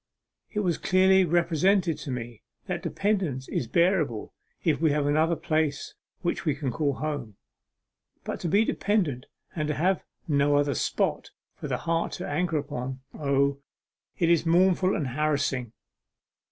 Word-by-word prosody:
It 210 Hz, -, -1 dB
was 175 Hz, -5 st, 0 dB
clearly 190 Hz, 0 st, +4 dB
represented 175 Hz, +1 st, +2 dB
to 145 Hz, -, -7 dB
me 120 Hz, -3 st, -5 dB, 0.2 s
that 180 Hz, -2 st, -3 dB
dependence 185 Hz, -11 st, -1 dB
is 120 Hz, -, -2 dB
bearable 170 Hz, -, +1 dB, 0.3 s
if -, -, +1 dB
we 160 Hz, -, +4 dB
have 145 Hz, 0 st, +1 dB
another 155 Hz, +3 st, +2 dB
place 155 Hz, -2 st, -1 dB, 0.3 s
which 175 Hz, -, -1 dB
we 150 Hz, -4 st, +1 dB
can 140 Hz, -3 st, -3 dB
call 145 Hz, +2 st, 0 dB
home; 140 Hz, -8 st, -4 dB, 0.9 s
but -, -, -4 dB
to -, -, -3 dB
be 200 Hz, +7 st, +4 dB
a -, -, -2 dB
dependent 175 Hz, -, 0 dB, 0.3 s
and 155 Hz, -2 st, -1 dB
to 150 Hz, -, -1 dB
have 185 Hz, +4 st, +1 dB, 0.3 s
no 145 Hz, -1 st, +3 dB
other 145 Hz, 0 st, +2 dB
spot -, -, -1 dB, 0.2 s
for -, -, -7 dB
the -, -, -1 dB
heart 165 Hz, 0 st, -1 dB
to -, -, -5 dB
anchor 160 Hz, +2 st, 0 dB
upon 130 Hz, -3 st, -4 dB
O, 140 Hz, -1 st, +1 dB, 0.6 s
it 170 Hz, -2 st, +3 dB
is 170 Hz, -, +4 dB
mournful 185 Hz, +2 st, +3 dB
and 140 Hz, -5 st, -2 dB
harassing!... 140 Hz, -4 st, 0 dB
155 Hz, 155 wpm, -27 LUFS, 140-175 Hz, 0.9 s, clearly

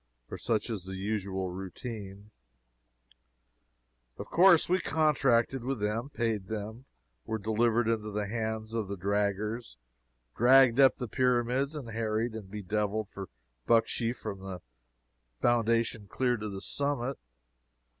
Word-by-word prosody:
For -, -, -7 dB
such 110 Hz, 0 st, 0 dB
is 100 Hz, -5 st, -4 dB
the 95 Hz, 0 st, -6 dB
usual 95 Hz, -2 st, -2 dB
routine. 100 Hz, +2 st, -7 dB, 1.9 s
Of -, -, -6 dB
course 175 Hz, -1 st, +5 dB
we 185 Hz, +1 st, +2 dB
contracted 135 Hz, -6 st, +2 dB
with 135 Hz, -1 st, -2 dB
them, 105 Hz, +5 st, -1 dB
paid 115 Hz, -7 st, -2 dB
them, 110 Hz, +4 st, -6 dB, 0.4 s
were 110 Hz, -, -1 dB
delivered 110 Hz, +2 st, +1 dB
into 110 Hz, -2 st, 0 dB
the 105 Hz, 0 st, -2 dB
hands 110 Hz, 0 st, -3 dB
of 110 Hz, -3 st, -1 dB
the 100 Hz, +1 st, -5 dB
draggers, 100 Hz, -, -1 dB, 0.6 s
dragged 130 Hz, +1 st, +6 dB
up 135 Hz, -2 st, +7 dB
the 125 Hz, -, -4 dB
Pyramids, 125 Hz, +4 st, +1 dB
and 135 Hz, -6 st, -6 dB
harried 110 Hz, +1 st, -1 dB
and 105 Hz, -4 st, -8 dB
be 105 Hz, +1 st, -6 dB
deviled 105 Hz, +1 st, -1 dB
for 100 Hz, -2 st, -8 dB, 0.4 s
bucksheesh 115 Hz, +1 st, +2 dB
from 105 Hz, -4 st, -6 dB
the 95 Hz, -2 st, -7 dB, 0.8 s
foundation 115 Hz, -2 st, +1 dB
clear 125 Hz, +3 st, +1 dB
to 105 Hz, -2 st, -5 dB
the 95 Hz, -1 st, -6 dB
summit. 140 Hz, +1 st, -1 dB
110 Hz, 135 wpm, -30 LUFS, 105-120 Hz, 1.9 s, up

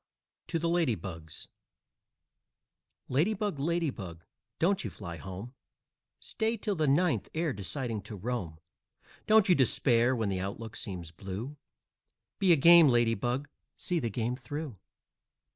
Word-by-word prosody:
TO 170 Hz, -, -1 dB
THE 165 Hz, +1 st, -1 dB
LADY 165 Hz, -8 st, +2 dB
BUGS 80 Hz, -6 st, -8 dB, 1.6 s
Lady 165 Hz, +12 st, +2 dB
Bug, 200 Hz, -7 st, -2 dB
Lady 165 Hz, +1 st, 0 dB
Bug, 85 Hz, -7 st, -9 dB, 0.3 s
don't 190 Hz, +4 st, +2 dB
you -, -, -3 dB
fly 85 Hz, -5 st, -8 dB
home 95 Hz, -, -8 dB, 0.7 s
Stay 225 Hz, +1 st, -1 dB
till 205 Hz, 0 st, -2 dB
the 155 Hz, -5 st, 0 dB
ninth 140 Hz, -, +2 dB
ere 160 Hz, -3 st, 0 dB
deciding 110 Hz, +2 st, -3 dB
to 105 Hz, +2 st, -8 dB
roam; 100 Hz, -6 st, -4 dB, 0.7 s
Don't 220 Hz, -2 st, +6 dB
you 185 Hz, -, +6 dB
despair 125 Hz, -3 st, +3 dB
when 110 Hz, -4 st, -1 dB
the 95 Hz, -1 st, -1 dB
outlook 110 Hz, +3 st, -5 dB
seems 90 Hz, -5 st, -6 dB
blue, 100 Hz, -, -6 dB, 0.8 s
Be 190 Hz, -2 st, +4 dB
a -, -, +8 dB
game 165 Hz, +2 st, +8 dB
Lady 120 Hz, -3 st, +3 dB
Bug 125 Hz, +6 st, -2 dB, 0.3 s
see 175 Hz, -2 st, -1 dB
the 120 Hz, -6 st, -2 dB
game 115 Hz, +3 st, -2 dB
through! 140 Hz, +1 st, -6 dB
125 Hz, 145 wpm, -30 LUFS, 100-165 Hz, 1.6 s, a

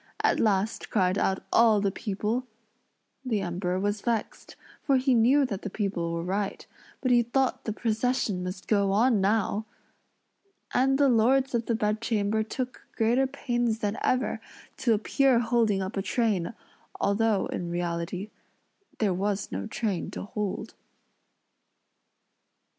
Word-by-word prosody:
at -, -, +3 dB
last 210 Hz, 0 st, 0 dB
cried 185 Hz, -3 st, +2 dB
out 190 Hz, -1 st, 0 dB
all 225 Hz, -2 st, +5 dB
the 200 Hz, -1 st, +1 dB
people. 215 Hz, +5 st, -2 dB, 0.8 s
The 225 Hz, -6 st, -1 dB
Emperor 180 Hz, 0 st, -2 dB
was 205 Hz, +1 st, -1 dB
vexed, 230 Hz, -3 st, -3 dB, 0.3 s
for 275 Hz, -2 st, +3 dB
he 260 Hz, 0 st, +2 dB
knew 255 Hz, +5 st, +4 dB
that 200 Hz, -6 st, -4 dB
the 205 Hz, -, -4 dB
people 195 Hz, -5 st, -2 dB
were 170 Hz, 0 st, -2 dB
right; 195 Hz, +3 st, -2 dB, 0.4 s
but 255 Hz, -, +1 dB
he 240 Hz, -1 st, +6 dB
thought 255 Hz, +3 st, 0 dB
the 220 Hz, -, -1 dB
procession 225 Hz, -3 st, -1 dB
must 185 Hz, +1 st, -6 dB
go 200 Hz, -2 st, +2 dB
on 225 Hz, 0 st, +3 dB
now! 215 Hz, +1 st, +1 dB, 1.1 s
And 270 Hz, +1 st, +3 dB
the 285 Hz, 0 st, +4 dB
lords 260 Hz, +3 st, +3 dB
of 235 Hz, -1 st, -1 dB
the 230 Hz, -, +1 dB
bedchamber 215 Hz, 0 st, 0 dB
took 250 Hz, +3 st, -5 dB
greater 240 Hz, +4 st, +2 dB
pains 240 Hz, -4 st, -1 dB
than 205 Hz, -1 st, -2 dB
ever, 255 Hz, +1 st, 0 dB, 0.4 s
to 230 Hz, -3 st, +2 dB
appear 260 Hz, +4 st, +2 dB
holding 230 Hz, -4 st, +2 dB
up 190 Hz, -, -5 dB
a 195 Hz, -, 0 dB
train, 210 Hz, -1 st, 0 dB, 0.4 s
although, 205 Hz, 0 st, +2 dB
in 175 Hz, -, -4 dB
reality, 175 Hz, +3 st, -3 dB, 0.7 s
there 210 Hz, -6 st, +1 dB
was 195 Hz, +2 st, -2 dB
no 95 Hz, +1 st, -4 dB
train 200 Hz, -7 st, -2 dB
to -, -, -6 dB
hold. 205 Hz, 0 st, -4 dB
215 Hz, 140 wpm, -27 LUFS, 195-240 Hz, 1.1 s, he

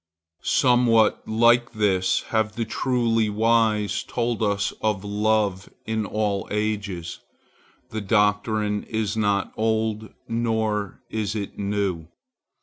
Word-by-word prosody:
Somewhat 120 Hz, -4 st, +3 dB
like 120 Hz, +2 st, +3 dB
this 95 Hz, -4 st, +1 dB
have 110 Hz, -1 st, 0 dB
the 115 Hz, -, -2 dB
truly 115 Hz, -2 st, +1 dB
wise 110 Hz, -2 st, +2 dB
told 120 Hz, -2 st, -2 dB
us 100 Hz, -1 st, 0 dB
of 105 Hz, -3 st, 0 dB
love 105 Hz, -2 st, 0 dB, 0.2 s
in 110 Hz, -1 st, -2 dB
all 105 Hz, -2 st, -1 dB
ages. 105 Hz, -5 st, -3 dB, 0.7 s
The 110 Hz, -1 st, -3 dB
doctrine 105 Hz, 0 st, +1 dB
is 110 Hz, -1 st, -2 dB
not 100 Hz, -2 st, 0 dB
old, 110 Hz, -1 st, -1 dB, 0.2 s
nor 110 Hz, -3 st, -1 dB
is 110 Hz, -1 st, -2 dB
it 100 Hz, -2 st, -5 dB
new. 100 Hz, -5 st, -2 dB
110 Hz, 110 wpm, -24 LUFS, 105-110 Hz, 0.7 s, Somewhat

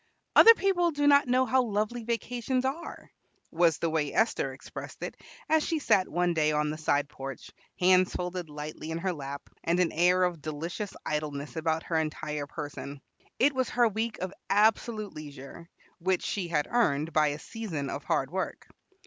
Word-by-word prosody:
"Other 460 Hz, 0 st, +10 dB
people 370 Hz, -4 st, +2 dB
do 290 Hz, -2 st, -1 dB
not 285 Hz, -2 st, +6 dB
know 255 Hz, +1 st, +3 dB
how 260 Hz, +2 st, +3 dB
lovely 220 Hz, +1 st, -1 dB
vacations 245 Hz, +2 st, -1 dB
are," 290 Hz, +6 st, -5 dB, 0.4 s
was 165 Hz, -1 st, +3 dB
the 170 Hz, -, -1 dB
way 150 Hz, -3 st, 0 dB
Esther 220 Hz, -11 st, +1 dB
expressed 130 Hz, -, -9 dB
it -, -, -5 dB, 0.3 s
as 315 Hz, 0 st, +3 dB
she 330 Hz, -, 0 dB
sat 195 Hz, -10 st, +2 dB
one 175 Hz, +1 st, +1 dB
day 155 Hz, -2 st, +2 dB
on 150 Hz, 0 st, +1 dB
the 155 Hz, -, -5 dB
side 145 Hz, -2 st, +1 dB
porch, 135 Hz, -2 st, -8 dB, 0.3 s
hands 185 Hz, 0 st, +4 dB
folded 180 Hz, -2 st, -4 dB
lightly 150 Hz, +1 st, -7 dB
in 160 Hz, -, -2 dB
her 185 Hz, +2 st, -1 dB
lap, 140 Hz, -2 st, -7 dB, 0.2 s
and 170 Hz, +2 st, +1 dB
an 180 Hz, -2 st, +2 dB
air 180 Hz, +2 st, +3 dB
of 175 Hz, -4 st, -1 dB
delicious 165 Hz, +7 st, -5 dB
idleness 150 Hz, -1 st, -3 dB
about 160 Hz, 0 st, 0 dB
her 165 Hz, -2 st, 0 dB
entire 150 Hz, -2 st, -3 dB
person. 145 Hz, -2 st, -7 dB, 0.4 s
It 280 Hz, +3 st, +4 dB
was 260 Hz, -1 st, 0 dB
her 240 Hz, -1 st, +3 dB
week 220 Hz, +1 st, -2 dB
of 185 Hz, +1 st, -3 dB, 0.2 s
absolute 215 Hz, 0 st, +2 dB
leisure, 150 Hz, +2 st, -10 dB, 0.3 s
which 185 Hz, +1 st, 0 dB
she 190 Hz, -4 st, -2 dB
had 150 Hz, -3 st, 0 dB
earned 160 Hz, -10 st, +1 dB
by 155 Hz, -1 st, +4 dB
a 145 Hz, 0 st, -2 dB
season 160 Hz, -5 st, -5 dB
of 140 Hz, -, -5 dB
hard 135 Hz, +1 st, 0 dB
work. 190 Hz, +1 st, -4 dB
175 Hz, 180 wpm, -29 LUFS, 150-225 Hz, 0.4 s, Other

